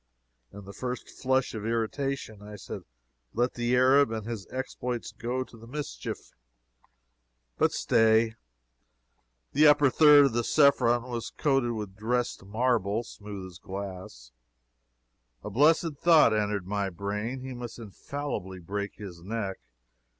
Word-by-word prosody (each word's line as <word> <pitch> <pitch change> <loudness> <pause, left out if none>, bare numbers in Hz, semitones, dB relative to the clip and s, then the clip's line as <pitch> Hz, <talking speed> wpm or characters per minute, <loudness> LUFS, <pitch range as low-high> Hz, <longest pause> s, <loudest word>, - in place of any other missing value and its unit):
In 100 0 -11
the 100 - -10
first 125 +2 -5
flush 130 0 0
of 110 -2 -5
irritation, 115 0 -2
I 105 0 -9
said - - -7 0.5
let 120 +2 +1
the 120 +1 0
Arab 130 +1 +5
and 110 -2 -4
his 115 -4 -5
exploits 125 -2 -4
go 120 +4 -3
to 125 - -16
the 115 0 -13
mischief. 145 +3 -6 1.3
But - - +4
stay. 110 0 +3 1.2
The 150 +2 +6
upper 145 -2 +5
third 145 -5 +7
of 120 -1 +1
Cephron 120 -5 +4
was 120 -2 -5
coated 135 -5 +1
with 105 -4 -6
dressed 120 +1 -1
marble, 110 0 0
smooth 100 -4 -9
as 90 -2 -12
glass. 95 -11 -8 1.1
A 105 - -6
blessed 150 - +3
thought 160 -7 +5
entered 105 -3 -1
my 100 0 -1
brain. 105 +7 -4
He 130 0 -6
must 120 -2 -7
infallibly 115 -3 -6
break 100 +3 -5
his 95 -5 -9
neck. 100 0 -4
115 Hz, 135 wpm, -28 LUFS, 100-130 Hz, 1.3 s, third